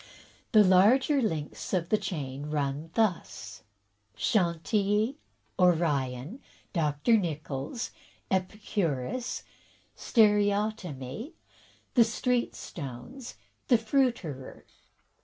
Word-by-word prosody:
The 215 -3 +7
larger 225 +10 +5
links 160 -4 -2
of 170 -1 -1
the 215 - +4
chain 145 -3 -4
run 145 +1 -2
thus 215 -6 -1 0.3
— 100 +1 -43
Chantilly, 205 - +1 0.4
Orion, 155 - +1 0.3
Dr. 155 +6 +2
Nichols, 155 - -3 0.4
Epicurus, 190 - -1 0.5
Stereotomy, 205 - +1 0.6
the 240 - +7
street 240 +2 0
stones, 140 - -8 0.3
the 245 - +6
fruiterer." 225 - -1
185 Hz, 80 wpm, -29 LUFS, 145-220 Hz, 0.6 s, The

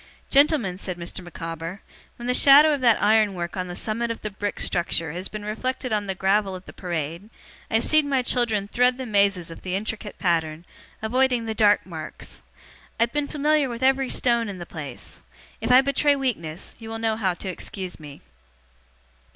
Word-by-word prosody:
Gentlemen,' 275 - +3
said 185 -3 -4
Mr. 175 +2 -6
Micawber, 165 +1 -6 0.3
'when 240 - -9
the 250 - +1
shadow 290 +4 +7
of 285 - -2
that 235 -3 +4
iron 210 -1 +3
work 170 -1 -4
on 185 -1 -3
the 175 - -6
summit 230 +4 -2
of 230 - -3
the 215 - -3
brick 205 +1 -4
structure 170 -2 0
has 180 +4 -4
been 210 -1 -7
reflected 255 +3 -3
on 205 -1 -1
the 190 - -2
gravel 195 +1 +1
of 185 0 -10
the - - -11
Parade, 170 +2 -4 0.4
I - - -1
have 225 - +3
seen 310 -2 +3
my 265 -2 +2
children 225 -5 +1
thread 250 +3 +2
the 260 - -5
mazes 200 -6 +1
of 165 - -10
the 185 0 -3
intricate 210 +1 -4
pattern, 165 -2 0 0.4
avoiding 250 +1 +2
the 220 - -2
dark 210 -2 +4
marks. 160 -4 -8 0.6
I - - +5
have 235 - -2
been 295 -1 0
familiar 295 -1 +1
with 240 +1 -5
every 265 0 +3
stone 235 -3 +1
in 195 - -6
the 175 - -7
place. 150 -5 -9 0.4
If - - 0
I 255 +1 +8
betray 280 +1 +2
weakness, 190 - -4
you 225 -1 -9
will 225 - -4
know 225 -1 0
how 190 -5 0
to 190 - -6
excuse 185 0 -7
me. 145 -2 -11
210 Hz, 200 wpm, -24 LUFS, 180-250 Hz, 0.6 s, I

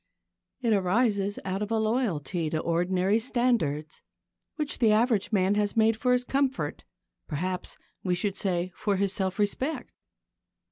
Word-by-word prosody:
It 230 -3 +2
arises 200 +1 +1
out 190 +1 -2
of 210 - -2
a 225 - +1
loyalty 195 - 0
to 160 - -1
ordinary 180 +5 +1
standards, 225 - 0 0.5
which 300 -2 -3
the 225 -4 +5
average 220 -1 +2
man 195 -2 +3
has 205 +1 0
made 225 0 +4
for 250 +3 +2
his 250 0 +2
comfort 275 0 -1 0.4
perhaps, 180 +4 -3 0.3
we 180 -2 +1
should 195 +2 -1
say, 180 -2 -1
for 205 -2 0
his 195 0 0
self 190 -1 -1
respect. 240 +9 -1
205 Hz, 145 wpm, -27 LUFS, 185-230 Hz, 0.5 s, the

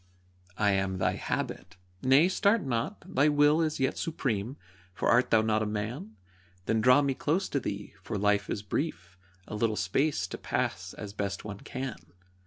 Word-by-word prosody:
I 105 -1 +3
am 95 -1 0
thy 95 - +2
Habit. 95 0 -4 0.2
Nay, 135 +6 +5
start 200 +3 +2
not, 130 - -2
thy 145 -5 +3
will 145 +2 +4
Is 155 -2 -1
yet 130 - 0
supreme, 130 -6 -2 0.4
for - - -1
art 120 +2 +4
thou 110 -1 +4
not 110 0 +1
a 110 - 0
man? 110 +1 -4 0.5
Then 110 0 +1
draw 125 +5 +6
me 140 -1 +1
close 160 +8 0
to 140 - 0
thee, 100 -4 -5
for 105 - -4
life 100 0 +1
is 105 - -3
brief 100 - -3 0.3
A - - -8
little 110 +1 +1
space 135 +4 0
to - - -6
pass 90 +1 -2
as 100 -1 -7
best 100 -1 -3
one 100 -2 -6
can. 130 -6 -5
110 Hz, 180 wpm, -29 LUFS, 100-140 Hz, 0.5 s, draw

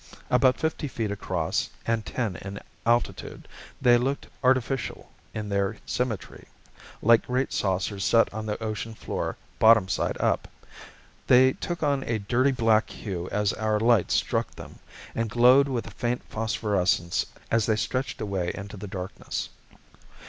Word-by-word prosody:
About 125 +1 +4
fifty 160 -1 -1
feet 115 -5 -3
across 90 -5 -1 0.2
and 115 -1 0
ten 110 -6 -2
in 100 +1 -7 0.3
altitude, 120 +1 0 0.3
they 120 -2 +5
looked 135 +3 -1 0.2
artificial 130 0 0 0.2
in 105 -1 -5
their 100 +1 0
symmetry 120 -5 -3 0.6
like 115 +1 +5
great 130 +2 0
saucers 95 +1 -1
set 115 0 +3
on 110 0 -5
the 105 - -2
ocean 110 +1 -4
floor - - -4 0.2
bottom 110 -3 +6
side 90 - -1
up. - - +1 0.8
They 130 +1 +6
took 175 -2 -4
on 140 -2 +2
a 115 - 0
dirty 120 +6 +2
black 115 -4 +2
hue 90 -4 -5
as 105 -1 +1
our 110 0 0
light 115 -3 +3
struck - - +1
them, - - -11 0.3
and 115 -1 -1
glowed 125 +5 +6
with 125 -4 -2
a - - -9
faint 120 +1 -2
phosphorescence 100 -6 0 0.2
as 115 -2 +2
they 110 - +3
stretched 130 +4 -2
away 95 -4 -1
into 100 +1 -8
the 105 +2 -7
darkness. 95 -1 -5
110 Hz, 150 wpm, -26 LUFS, 100-125 Hz, 0.8 s, bottom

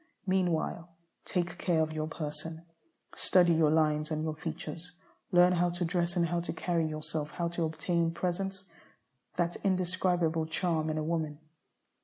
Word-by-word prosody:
Meanwhile, 175 -2 0 0.4
take 175 -2 -1
care 170 -3 +2
of 155 0 +1
your 155 0 -2
person, 160 +1 -5 0.5
study 175 -2 +4
your 160 -2 +4
lines 155 -1 +2
and 155 -1 -1
your 160 -1 -1
features, 165 +2 -6 0.4
and 180 - +1
learn 180 +1 +7
how 175 0 +2
to 175 0 -1
dress 175 0 0
and 175 -1 +3
how 170 +1 0
to 170 - -3
carry 170 -1 0
yourself; 155 -1 -3
how 170 +1 -2
to 170 -1 -1
obtain 165 +1 0
"presence," 185 +3 -2 0.7
that 175 0 0
indescribable 180 -3 +1
charm 160 -1 0
in 155 0 -1
woman. 160 -3 -1
170 Hz, 155 wpm, -31 LUFS, 155-175 Hz, 0.7 s, learn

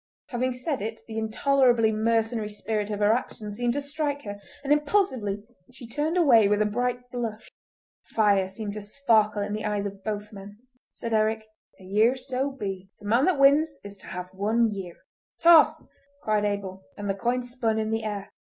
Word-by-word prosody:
Having 255 +1 -1
said 255 +1 -3
it 220 +2 -5
the 220 -1 -4
intolerably 240 0 +3
mercenary 225 0 0
spirit 210 0 -3
of 210 -1 -3
her 205 +1 +5
action 220 -3 -4
seemed 240 +3 -1
to 285 - -1
strike 285 0 -3
her, 205 -1 -7 0.2
and 285 +1 +3
impulsively 285 - 0 0.3
she 250 0 -12
turned 300 +8 -1
away 240 - +6
with 205 0 +2
a 215 - +3
bright 245 +3 -2
blush. 225 -3 -5 0.5
Fire 200 -4 +2
seemed 205 +1 -6
to 210 - -6
sparkle 215 -2 +2
in 205 +1 -4
the 215 - -3
eyes 205 -1 -1
of 195 -1 -7
both 210 0 -4
men. 200 +1 -10 0.3
Said 230 -1 -5
Eric: 220 0 +1 0.3
"A - - -15
year 215 +6 +3
so 260 +1 -2
be! 195 -8 -6
The 205 - -13
man 235 +7 +3
that 370 -5 +2
wins 285 +2 +4
is 200 0 -9
to - - -12
have 180 0 -7
one 220 +4 +1
year." 190 -4 -6 0.4
"Toss!" 335 -2 +6 0.4
cried 215 -1 +1
Abel, 195 -2 -3 0.2
and 205 - -5
the 195 - +1
coin 240 +5 -1
spun 245 -3 -1
in 220 0 -1
the 225 0 -1
air. 205 -2 -4
220 Hz, 190 wpm, -26 LUFS, 205-250 Hz, 0.5 s, away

